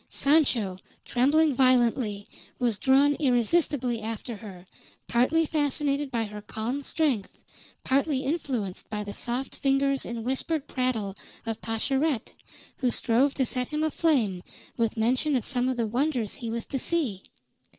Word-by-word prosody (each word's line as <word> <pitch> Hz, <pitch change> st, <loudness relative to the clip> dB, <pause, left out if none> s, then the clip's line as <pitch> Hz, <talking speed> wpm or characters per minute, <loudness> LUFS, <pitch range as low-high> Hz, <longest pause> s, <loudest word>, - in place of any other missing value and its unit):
Sancho, 255 Hz, -11 st, +2 dB, 0.3 s
trembling 290 Hz, +5 st, +3 dB
violently, 240 Hz, -5 st, +2 dB, 0.3 s
was 235 Hz, -5 st, 0 dB
drawn 275 Hz, +2 st, +4 dB
irresistibly 250 Hz, -2 st, +2 dB
after 225 Hz, +1 st, -5 dB
her, 190 Hz, -4 st, -11 dB, 0.4 s
partly 275 Hz, +8 st, +3 dB
fascinated 290 Hz, -1 st, 0 dB
by 235 Hz, -3 st, -1 dB
her 210 Hz, -1 st, -7 dB
calm 225 Hz, +6 st, -4 dB
strength, 275 Hz, -8 st, -1 dB, 0.5 s
partly 275 Hz, +1 st, +1 dB
influenced 260 Hz, -, -3 dB
by 210 Hz, -1 st, -3 dB
the 205 Hz, 0 st, -6 dB
soft 250 Hz, +5 st, -3 dB
fingers 275 Hz, 0 st, +1 dB
and 230 Hz, -1 st, -5 dB
whispered 280 Hz, +3 st, -1 dB
prattle 230 Hz, -7 st, -1 dB, 0.3 s
of 225 Hz, -1 st, -4 dB
Pascherette, 265 Hz, +4 st, -1 dB, 0.4 s
who 255 Hz, -, +1 dB
strove 250 Hz, +4 st, +2 dB
to 265 Hz, -, +1 dB
set 250 Hz, +1 st, -2 dB
him 305 Hz, 0 st, -2 dB
aflame 275 Hz, -, +1 dB, 0.3 s
with 230 Hz, -1 st, 0 dB
mention 255 Hz, +6 st, +2 dB
of 245 Hz, -, 0 dB
some 250 Hz, -1 st, 0 dB
of 255 Hz, -, -2 dB
the 230 Hz, -, +1 dB
wonders 245 Hz, -1 st, 0 dB
he 235 Hz, -5 st, -6 dB
was 230 Hz, 0 st, -3 dB
to 270 Hz, -, -3 dB
see. 255 Hz, -, -1 dB
255 Hz, 140 wpm, -27 LUFS, 225-280 Hz, 0.5 s, drawn